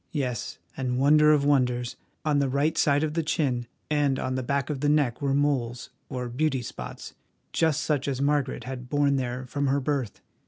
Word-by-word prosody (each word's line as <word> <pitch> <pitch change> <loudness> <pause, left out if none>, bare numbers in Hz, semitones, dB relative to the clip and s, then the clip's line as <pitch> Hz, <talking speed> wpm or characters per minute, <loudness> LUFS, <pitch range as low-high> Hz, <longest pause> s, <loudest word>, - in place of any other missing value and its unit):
Yes, 125 -7 -2 0.2
and 125 -2 -1
wonder 150 +3 +6
of 145 -2 +3
wonders, 125 -4 +1 0.3
on 150 -2 +3
the 140 -1 +1
right 140 +4 +1
side 145 +1 +3
of 155 -1 -1
the 165 - +1
chin 130 -6 0 0.2
and 145 -3 +1
on 130 - -2
the 130 - -1
back 140 +3 -1
of 140 - -3
the 145 +1 +1
neck 145 -5 +2
were 140 -1 +1
moles, 130 -4 0 0.2
or 125 -1 -3
beauty 135 +1 0
spots, - - -8 0.4
just 160 -2 +2
such 145 -3 0
as 135 -2 -1
Margaret 140 -1 0
had 125 -1 -7
borne 145 0 +2
there 125 0 -3
from 140 +2 -1
her 140 +1 +2
birth! 135 -5 -2
140 Hz, 195 wpm, -26 LUFS, 125-145 Hz, 0.4 s, wonder